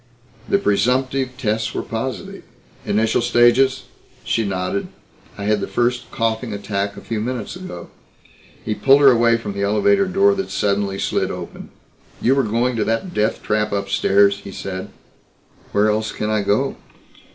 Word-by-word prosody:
"The - - +4
presumptive 130 - 0
tests 110 -3 -1
were - - -2
positive." - - -5 0.5
"Initial 110 +2 +2
stages?" 130 +2 +3 0.4
She 115 - 0
nodded. 95 -1 -2 0.5
"I 100 - -6
had 105 0 +1
the - - -3
first 120 0 -1
coughing 115 0 -2
attack 100 0 -3
a - - -8
few 110 -2 -3
minutes 125 +3 -4
ago." 180 - -9 0.7
He 110 - 0
pulled 135 +5 +4
her 140 -2 +8
away 115 -1 +4
from 105 -3 -6
the 100 - -4
elevator 110 - +3
door 195 +2 +3
that 195 -1 -3
suddenly 100 -1 0
slid - - -1
open. - - -8 0.5
"You 125 - +3
were 135 - +3
going 120 +2 0
to 110 - +1
that 115 +12 -2
death 110 -4 0
trap 105 0 0
upstairs," 100 0 +2
he 100 - -10
said. 95 -1 -6 0.8
"Where 105 +1 +3
else 110 0 -1
can 105 0 -3
I 110 -1 +1
go?" 105 +7 0
110 Hz, 160 wpm, -20 LUFS, 100-130 Hz, 0.8 s, her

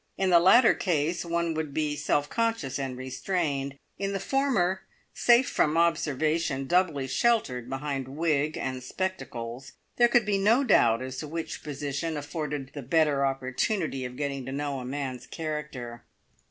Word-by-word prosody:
In 190 -1 +1
the 170 - +8
latter 210 +8 +7
case 170 -2 0
one 170 -1 -1
would 155 -3 -4
be 150 -1 0
self 145 0 0
conscious 225 - -1
and 130 -2 -3
restrained; 140 0 -2 0.2
in 195 0 -1
the 195 - -1
former, 195 -7 +1 0.3
safe 240 +2 +4
from 155 +2 +1
observation, 155 -3 +1
doubly 165 -4 +2
sheltered 130 - +1
behind 135 0 -3
wig 150 +1 0
and 130 -1 -3
spectacles, 130 -8 -5 0.2
there 240 - +6
could 240 -1 +3
be 205 -2 +1
no 225 +7 +4
doubt 120 - +4
as 130 0 -6
to 155 - -5
which 165 +2 -5
position 145 +2 -3
afforded 145 -2 -4
the 145 - -6
better 145 +1 +2
opportunity 135 - -1
of 125 0 -6
getting 140 -2 -3
to - - -4
know 140 0 -2
a 125 - -6
man's 130 -2 -4
character. 150 -7 -5
150 Hz, 155 wpm, -27 LUFS, 135-175 Hz, 0.3 s, the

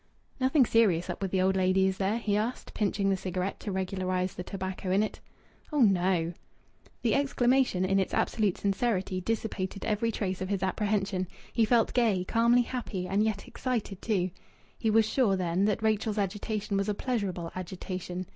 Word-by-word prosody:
"Nothing 265 +1 +4
serious 200 -8 +3
up - - -7
with 195 - -1
the 185 0 +1
old 190 0 +2
lady, 190 0 +3
is 190 0 0
there?" 200 +3 +1
he 215 -3 0
asked, 220 +4 -2
pinching 200 -1 +1
the - - +3
cigarette 185 +1 -3
to 205 - -5
regularize 185 -1 -1
the - - -6
tobacco 190 0 -5
in 195 +3 +3
it. 215 - -4 0.5
"Oh, 295 -2 +1
no!" 180 -5 +3 0.7
The 230 - +2
exclamation 255 -7 +2
in 195 +1 +2
its 190 - 0
absolute 210 -5 +1
sincerity 195 -2 0
dissipated 200 -2 -3
every 220 +2 0
trace 190 -4 -3
of 185 - -3
his 195 -2 -1
apprehension. 195 -1 0 0.3
He 230 - +3
felt 230 0 +3
gay, 220 -7 +2
calmly 235 +5 +3
happy, 225 -7 -4
and 195 +3 +1
yet 215 -2 -1
excited 225 -7 -3
too. 185 -5 0 0.4
He 225 - -1
was 220 0 +4
sure, 220 -4 +2
then, 180 +1 +1
that 210 +1 0
Rachel's 215 0 +1
agitation 205 +1 -2
was 200 +1 0
a 210 - 0
pleasurable 195 -9 -2
agitation. 185 0 -5
195 Hz, 175 wpm, -29 LUFS, 185-220 Hz, 0.7 s, Nothing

